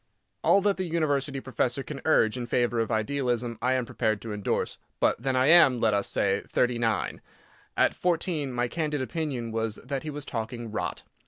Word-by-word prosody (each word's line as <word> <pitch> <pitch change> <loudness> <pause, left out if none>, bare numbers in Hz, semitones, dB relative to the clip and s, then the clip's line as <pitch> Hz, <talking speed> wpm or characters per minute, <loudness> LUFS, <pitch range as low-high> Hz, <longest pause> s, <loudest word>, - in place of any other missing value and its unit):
All 200 - +5
that 200 0 +1
the 185 - -2
University 145 -4 0
professor 130 0 -1
can 135 +1 -7
urge 115 -8 +4
in 120 -1 -4
favour 120 -1 +1
of 115 - 0
idealism 120 0 -1
I 130 +1 +2
am 130 -2 0
prepared 110 -3 -1
to 110 -2 -5
endorse. 105 -1 -2 0.2
But - - +2
then 135 0 0
I 130 0 +3
am—let 130 -9 +6
us 100 -1 +1
say, 100 0 +1
thirty 120 -1 +1
nine. 110 -3 -1 0.6
At - - +4
fourteen 165 -5 -1
my 120 0 0
candid 150 -1 -2
opinion 130 -6 -3
was 110 -1 -1
that 135 +1 -3
he 155 - -5
was 145 -1 -6
talking 115 -2 -5
"rot." - - -3
125 Hz, 185 wpm, -27 LUFS, 115-145 Hz, 0.6 s, am—let